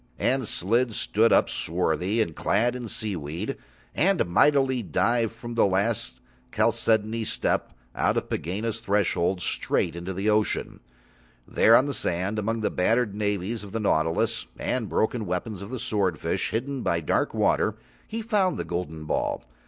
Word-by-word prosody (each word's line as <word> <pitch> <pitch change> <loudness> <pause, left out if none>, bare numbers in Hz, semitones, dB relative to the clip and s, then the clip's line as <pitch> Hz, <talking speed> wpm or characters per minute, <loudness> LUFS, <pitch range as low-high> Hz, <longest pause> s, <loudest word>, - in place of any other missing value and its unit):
And 130 -3 +1
Slid 115 +6 +1
stood 110 +2 +2
up, - - +5
swarthy, 90 +6 0
and 80 -6 -8
clad 120 +5 +1
in 125 -2 -5
seaweed, 90 -4 -3 0.4
and 190 +3 +2
mightily 130 +7 +3
dived 115 +2 +1
from 120 +1 -8
the 115 - +4
last 100 - -1 0.3
chalcedony 115 -1 +1
step - - -1 0.2
out - - +1
of - - -1
Pegāna's 105 +7 -3
threshold 100 -4 +1
straight 85 -1 0
into 95 +3 -4
ocean. 105 0 +1 0.7
There 115 - +5
on 130 - +5
the 140 - -2
sand, 95 +1 -1
among 110 +2 -1
the - - 0
battered 110 +3 +1
navies 105 +1 -2
of 100 - -10
the 115 - -1
nautilus 105 +5 +1
and 120 -5 -2
broken 110 -1 0
weapons 90 +3 -3
of 100 - -7
the 130 - -4
swordfish, 100 -8 -1
hidden 130 +4 -2
by 85 -5 0
dark 75 - 0
water, - - +2 0.3
he 225 +1 -4
found 205 -4 +1
the - - -3
golden 80 -2 -4
ball. - - -1
110 Hz, 150 wpm, -26 LUFS, 90-115 Hz, 0.7 s, up